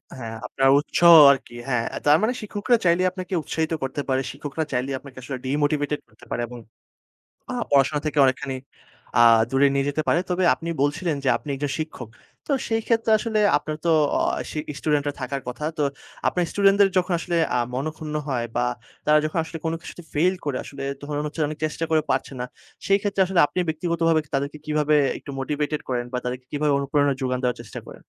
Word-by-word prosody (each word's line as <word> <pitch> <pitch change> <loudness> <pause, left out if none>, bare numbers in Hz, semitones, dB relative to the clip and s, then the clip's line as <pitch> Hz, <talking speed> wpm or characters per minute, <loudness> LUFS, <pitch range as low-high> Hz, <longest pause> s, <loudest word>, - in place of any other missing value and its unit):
হ্যাঁ 115 -3 -6
আপনার 135 0 +2
উৎসাহ 170 +3 +5 0.2
আরকি 130 -3 -3
হ্যাঁ। 125 -3 0
অ্যা - - -5
তার 150 +1 +6
মানে 225 +3 +1
শিক্ষকরা 215 +3 +1
চাইলে 170 +2 +4
আপনাকে 185 +1 -7
উৎসাহিত 160 +2 -2
করতে 135 +2 -2
পারে 130 0 +2
শিক্ষকরা 145 +3 -4
চাইলেই 130 +2 -1
আপনাকে 135 -2 -14
আসলে 130 +1 -5
ডিমোটিভেটেড 145 +1 0
করতে - - -19
পারে - - -1
এবং 120 0 -9 0.9
আ - - -3 0.2
পড়াশোনা 140 +1 +3
থেকে 150 -1 -1
অনেকখানি 130 0 0 0.6
আ - - +8 0.3
দূরে 135 +2 +4
নিয়ে 140 0 +1
যেতে 150 +2 -1
পারে। 170 - +4
তবে 180 +1 +1
আপনি 170 - -8
বলছিলেন 155 +2 0
যে - - +2
আপনি - - -10
একজন 140 +1 -3
শিক্ষক। 155 -7 -5 0.4
তো 290 - -1 0.2
সেই 225 0 0
ক্ষেত্রে 225 -1 +1
আসলে 220 -1 -1 0.2
আপনার 155 +1 -3
তো - - +4 0.3
অ - - 0 0.2
আ - - -2
সি 155 - -4 0.2
স্টুডেন্টরা 145 -1 0
থাকার 135 +1 -3
কথা। 130 +5 -5
তো - - +2 0.5
আপনার 180 - 0
স্টুডেন্টদের 200 0 +5
যখন 180 0 0
আসলে 175 -1 -2 0.2
আ - - +2 0.2
মনক্ষুন্ন 155 +2 -4
হয় 120 -4 -1
বা 120 - +2 0.4
তারা 150 0 +6
যখন 155 +2 -1
আসলে 165 0 -7
কোন 160 - 0
কিছুতে 175 - -10
ফেইল 180 +5 +3
করে 145 -3 -1
আসলে 140 -1 -8 0.2
তখন 145 0 -3
হচ্ছে 155 +2 -6
অনেক 155 0 -6
চেষ্টা 155 +1 -2
করে 155 -1 +3
পারছে 130 +1 0
না - - -1 0.4
সেই 195 0 +4
ক্ষেত্রে 200 -1 -1
আসলে 180 -2 +2
আপনি 185 - -6
ব্যক্তিগতভাবে 165 0 +1
তাদেরকে 140 +2 -2
কিভাবে 150 0 +2 0.2
একটু - - -10
মোটিভেটেড 150 +2 -2
করেন? 125 -2 -1
বা 125 - -1
তাদেরকে 125 0 -4
কিভাবে 150 0 +1
অনুপ্রেরণা 140 0 +1
যোগান 130 -1 0
দেওয়ার 125 -1 0
চেষ্টা 110 - -8
করেন? - - -10
150 Hz, 195 wpm, -24 LUFS, 135-165 Hz, 0.9 s, আ